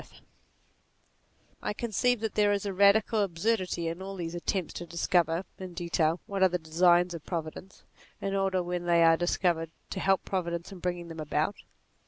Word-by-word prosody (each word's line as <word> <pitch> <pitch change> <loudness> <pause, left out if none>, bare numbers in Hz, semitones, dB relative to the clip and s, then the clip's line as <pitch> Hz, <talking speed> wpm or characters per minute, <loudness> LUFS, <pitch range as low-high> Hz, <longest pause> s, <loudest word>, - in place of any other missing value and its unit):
NATURE - - -17
55 - - -19 1.4
I - - -2
conceive 235 +2 0
that 220 -2 -2
there 210 -1 +3
is 200 0 0
a 200 - -2
radical 205 +3 +4
absurdity 185 -2 0
in 165 +3 -4
all 195 +1 -6
these 170 -2 -5
attempts 175 0 -2
to 175 - -7
discover, 170 0 +1 0.2
in 185 -2 -8
detail, 170 -1 0
what 200 -1 -4
are 190 - +6
the 180 - 0
designs 175 +2 +3
of 165 -3 -7
Providence, 170 +2 -6 0.4
in 195 - -3
order 190 -2 +1
when 175 0 -3
they 170 -1 +4
are 165 0 +6
dis 175 +1 0
covered 165 -3 +1 0.2
to 190 - -3
help 195 0 +2
Providence 170 -2 -3
in 190 - -9
bringing 175 -1 -3
them 165 -1 -8
about. 155 +5 -1
180 Hz, 190 wpm, -29 LUFS, 170-195 Hz, 1.4 s, are